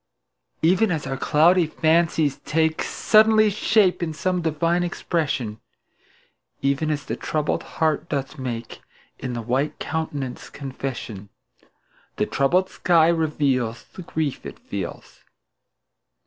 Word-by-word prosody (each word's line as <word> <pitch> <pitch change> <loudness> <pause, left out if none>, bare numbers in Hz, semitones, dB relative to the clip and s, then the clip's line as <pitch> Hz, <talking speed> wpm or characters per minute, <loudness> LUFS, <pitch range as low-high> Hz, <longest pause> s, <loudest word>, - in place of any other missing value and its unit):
Even 185 +6 +4
as 160 -4 -2
our 135 - -3
cloudy 165 +5 +4
fancies 160 -2 +2
take 160 0 0
Suddenly 215 0 +4
shape 200 -2 +2
in 160 -2 -2
some 180 +2 0
divine 165 +2 +1
expression, 150 -10 -2 1.0
Even 140 +3 +1
as 150 -1 -2
the - - -3
troubled 150 -1 -1 0.2
heart 160 +1 +1
doth 140 0 -3
make 120 -3 -5 0.4
In 125 -2 -4
the 120 -1 -4
white 130 +6 -1
countenance 145 -6 -4
confession, 130 -7 -6 0.9
The - - 0
troubled 180 +7 +2
sky 165 -2 +4
reveals 140 -8 0
The - - -8
grief 155 -4 -3
it - - -8
feels. - - -7
155 Hz, 120 wpm, -23 LUFS, 135-170 Hz, 1.0 s, Even